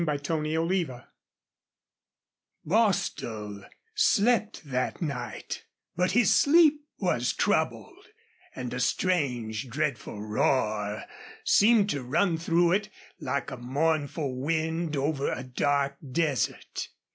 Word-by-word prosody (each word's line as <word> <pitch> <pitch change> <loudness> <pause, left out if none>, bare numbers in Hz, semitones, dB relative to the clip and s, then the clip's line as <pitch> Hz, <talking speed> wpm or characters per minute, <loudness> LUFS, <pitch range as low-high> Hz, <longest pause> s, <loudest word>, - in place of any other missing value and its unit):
CHAPTER 150 +1 -1
XII 165 +2 0 1.8
Bostil 115 - 0 0.3
slept 225 - +2
that 130 -2 -2
night, 140 -7 -5 0.3
but 180 +2 +1
his 240 0 +4
sleep 300 0 +5 0.2
was - - 0
troubled, 390 0 -1 0.5
and 125 -2 -5
a 125 - -3
strange, 125 - 0
dreadful 145 -4 -2
roar 105 -1 0 0.4
seemed 210 -1 +5
to 140 - -2
run 165 +7 +1
through 170 +1 +3
it, 205 +3 +1 0.3
like 140 +2 -2
a - - -5
mournful 145 +2 -1
wind 160 +1 -1
over 140 0 0
a 125 - -4
dark 140 +2 0
desert. 150 -2 -1
150 Hz, 100 wpm, -28 LUFS, 130-180 Hz, 1.8 s, sleep